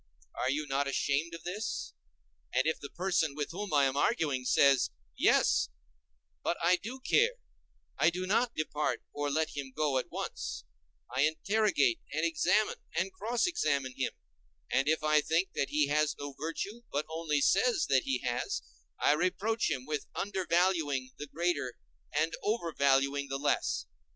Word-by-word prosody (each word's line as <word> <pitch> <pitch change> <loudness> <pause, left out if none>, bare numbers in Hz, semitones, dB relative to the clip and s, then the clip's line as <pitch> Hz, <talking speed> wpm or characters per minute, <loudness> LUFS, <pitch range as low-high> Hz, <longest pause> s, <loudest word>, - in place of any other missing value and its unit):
Are 130 - -1
you 150 +3 0
not 140 0 0
ashamed 145 +4 0
of 165 - -11
this? 200 - -4 0.6
And 130 +3 +2
if 160 - 0
the 140 - -7
person 175 -5 0
with 150 -1 -3
whom 200 +3 -5
I 145 -2 +4
am 135 0 0
arguing 145 - +1
says: 135 +1 +4 0.3
Yes, - - +3 0.7
but 170 - -1
I 180 +2 +4
do 235 +8 -7
care; 475 - +3 0.6
I - - +6
do 180 +2 -3
not 230 +5 +1
depart 150 -1 -1
or 145 0 -1
let 155 +2 0
him 140 -2 -5
go 145 -2 +1
at - - -6
once; - - -5 0.5
I 130 - +2
interrogate 215 - +2
and - - 0
examine 330 +8 +2 0.2
and 390 - 0
cross 240 -9 0
examine 140 - 0
him, 130 - -1 0.6
and 135 +1 +2
if 160 0 +1
I 155 0 +4
think 165 +5 +1
that 135 - -1
he 150 0 +3
has 150 0 +2
no 145 -1 -6
virtue, 180 +10 -4
but 145 +2 -1
only 160 -2 -1
says 215 - +3
that 135 -2 +4
he 130 -2 0
has, 120 -1 -2 0.4
I - - +4
reproach 190 +7 0
him 130 -4 -2
with 150 0 -3
undervaluing 170 -8 +1
the 150 - -5
greater, 155 -5 -1 0.3
and 155 +3 +1
overvaluing 140 -8 +1
the 135 - -1
less. 145 - 0
155 Hz, 160 wpm, -31 LUFS, 140-185 Hz, 0.7 s, I